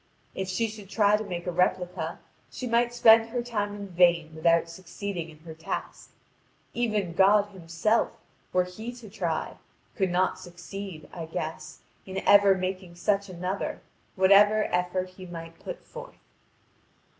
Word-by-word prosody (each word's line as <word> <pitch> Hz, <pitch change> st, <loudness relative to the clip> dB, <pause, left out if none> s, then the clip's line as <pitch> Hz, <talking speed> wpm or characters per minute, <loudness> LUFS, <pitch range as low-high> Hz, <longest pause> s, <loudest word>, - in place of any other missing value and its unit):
If 190 Hz, -, -3 dB
she 210 Hz, +5 st, 0 dB
should 210 Hz, -3 st, -10 dB
try 205 Hz, -1 st, +4 dB
to 215 Hz, -, -2 dB
make 175 Hz, -4 st, -5 dB
a 180 Hz, -, -1 dB
replica, 180 Hz, 0 st, 0 dB, 0.3 s
she 255 Hz, -, -6 dB
might 235 Hz, 0 st, +2 dB
spend 225 Hz, -1 st, +6 dB
her 240 Hz, +1 st, -2 dB
time 205 Hz, -4 st, -2 dB
in 200 Hz, -1 st, -7 dB
vain 170 Hz, -3 st, +3 dB
without 165 Hz, +1 st, +3 dB
succeeding 175 Hz, 0 st, -6 dB
in 155 Hz, -, -14 dB
her 160 Hz, 0 st, -9 dB
task. 160 Hz, +1 st, -6 dB, 0.6 s
Even 215 Hz, -7 st, -1 dB
God 200 Hz, +3 st, +5 dB
Himself, 185 Hz, +5 st, 0 dB, 0.3 s
were 180 Hz, 0 st, +3 dB
He 215 Hz, +6 st, -7 dB
to 235 Hz, -4 st, -12 dB
try, 175 Hz, -6 st, -3 dB, 0.4 s
could 190 Hz, -3 st, +1 dB
not 180 Hz, +1 st, +1 dB
succeed, 175 Hz, -1 st, -8 dB
I 165 Hz, -2 st, -6 dB
guess, 155 Hz, -1 st, -6 dB, 0.3 s
in 190 Hz, 0 st, -5 dB
ever 200 Hz, -1 st, +7 dB
making 185 Hz, -1 st, -4 dB
such 200 Hz, +3 st, 0 dB
another, 185 Hz, +2 st, -3 dB, 0.4 s
whatever 205 Hz, +3 st, +6 dB
effort 180 Hz, +1 st, 0 dB
He 185 Hz, 0 st, -11 dB
might 165 Hz, -1 st, -9 dB
put -, -, -8 dB
forth." -, -, -10 dB
190 Hz, 150 wpm, -27 LUFS, 175-210 Hz, 0.6 s, ever